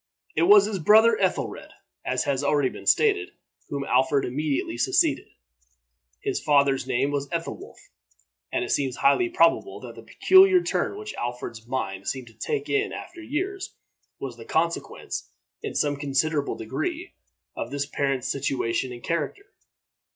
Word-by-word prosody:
It 160 - +1
was 205 -1 +8
his 205 -2 -3
brother 220 +6 +6
Ethelred, 190 -2 -2 0.3
as 130 0 0
has 140 -1 -1
already 145 -2 +2
been - - -11
stated, 405 -3 +3 0.4
whom 140 -1 -3
Alfred 130 +1 +2
immediately 135 -2 -2
succeeded. 120 - +2 0.9
His - - -1
father's 140 -3 +3
name 135 +2 +1
was 140 -1 -2
Ethelwolf; 170 -1 -5 0.7
and - - 0
it - - -5
seems 135 -3 0
highly 140 -4 +3
probable 165 - +2
that - - -9
the - - -11
peculiar 375 -1 +5
turn 400 - -1
which 425 0 -7
Alfred's 120 -2 -5
mind 95 -7 -3
seemed 130 -3 -3
to - - -19
take 430 - -3
in 415 0 0
after 350 -1 -8
years, 380 +5 -4 0.4
was 130 -3 -6
the 115 - -9
consequence, 170 +1 -2 0.3
in - - -5
some 145 -1 +1
considerable 145 +1 0
degree, 155 - -4 0.4
of - - -4
this 140 0 -2
parent's 135 -3 -1
situation 130 -3 -1
and 120 -1 -9
character. 170 - -3
145 Hz, 150 wpm, -25 LUFS, 130-215 Hz, 0.9 s, was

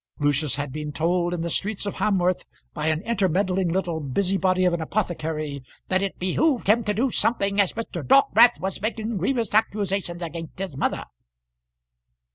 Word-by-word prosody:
Lucius 145 0 +1
had 145 -1 -4
been 150 +1 -5
told 175 +3 0
in 175 -2 -2
the 170 - -2
streets 210 +3 -1
of 200 - -2
Hamworth 185 -3 +1 0.3
by 155 -1 -3
an 160 +3 0
intermeddling 190 -4 +1
little 175 -2 -1
busybody 185 +5 +1
of 180 - +3
an 170 - -1
apothecary 155 -6 -3 0.3
that 185 0 +2
it 195 -1 -3
behoved 245 - +1
him 225 +4 +3
to 210 - +1
do 250 +4 +1
something, 200 -4 +2
as 195 - 0
Mr. 220 -6 -5
Dockwrath 240 - +5
was 190 +1 -3
making 220 0 -2
grievous 225 +3 -1
accusations 200 -5 0
against 165 -1 -7
his 190 -6 -5
mother. - - -1
185 Hz, 165 wpm, -24 LUFS, 165-205 Hz, 0.3 s, Dockwrath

